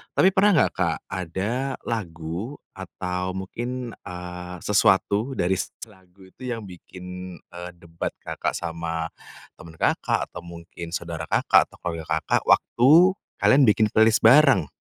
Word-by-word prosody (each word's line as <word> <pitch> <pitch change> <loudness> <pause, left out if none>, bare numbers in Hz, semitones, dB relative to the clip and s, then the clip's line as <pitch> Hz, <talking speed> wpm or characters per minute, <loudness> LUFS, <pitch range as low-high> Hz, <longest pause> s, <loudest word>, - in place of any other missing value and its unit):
Tapi 190 - +5
pernah 200 -1 +4
nggak, 150 - +3
Kak, - - 0
ada 100 +10 -2
lagu 90 - -4 0.2
atau 90 -1 -5
mungkin, 120 +6 -5 0.2
eee, 90 0 -7
sesuatu 105 +5 +2
dari 90 +2 0
s - - -2 0.2
lagu 95 -3 -16
itu 130 - -9
yang 115 -3 -4
bikin, 90 -1 -9
eee, 90 0 -10
debat 85 -1 -6
Kakak - - -3
sama 85 -1 -4 0.5
teman 80 -1 -12
Kakak, - - 0
atau - - -7
mungkin 85 0 -8
saudara 85 -3 -5
Kakak, - - +4
atau - - -15
kolega 85 -2 -4 0.2
Kakak, - - +1
waktu 125 +3 +4 0.5
kalian 135 -2 +5
bikin 105 0 +3
playlist 110 0 +4
bareng? 120 - +6
95 Hz, 140 wpm, -24 LUFS, 85-115 Hz, 0.5 s, bareng